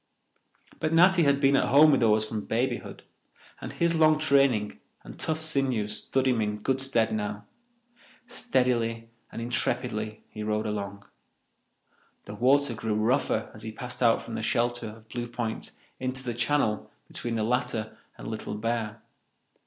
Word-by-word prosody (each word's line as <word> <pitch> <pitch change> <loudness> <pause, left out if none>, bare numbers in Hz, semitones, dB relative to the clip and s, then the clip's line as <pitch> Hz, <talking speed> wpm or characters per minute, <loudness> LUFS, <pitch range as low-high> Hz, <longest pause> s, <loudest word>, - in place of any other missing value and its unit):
But 155 +1 -1
Natty 180 +2 +6
had 140 0 +3
been 140 0 +4
at - - +2
home 150 +2 +7
with 135 - +4
the 115 - +3
oars 105 0 +3
from 110 -1 -5
babyhood, 120 +4 -2 0.6
and - - -6
his 170 0 +1
long 155 -1 +5
training 135 - +2 0.2
and - - -11
tough 160 0 -1
sinews 130 -9 0
stood 135 0 0
him 125 -3 +2
in 105 0 -1
good 135 0 +1
stead 120 -5 +1
now. 105 -1 -3 0.8
Steadily 120 - 0 0.2
and - - -6
intrepidly 110 -3 -2
he 110 - -9
rowed 105 0 -1
along. 100 -1 -4 1.2
The 105 - -8
water 135 +4 +3
grew 110 -1 -2
rougher 115 +6 +1
as 110 - -9
he 110 - -5
passed 125 +2 -7
out 115 -2 +4
from 115 - -8
the - - -3
shelter 120 +1 0
of 110 +1 -12
Blue 120 -1 -4
Point 120 -2 -4 0.3
into 130 +1 -3
the 120 -2 -3
channel 120 -2 0 0.2
between 120 -1 -3
the 110 - 0
latter 110 -2 -1 0.2
and - - -9
Little 110 -2 -5
Bear. 110 0 -3
120 Hz, 160 wpm, -27 LUFS, 110-135 Hz, 1.2 s, home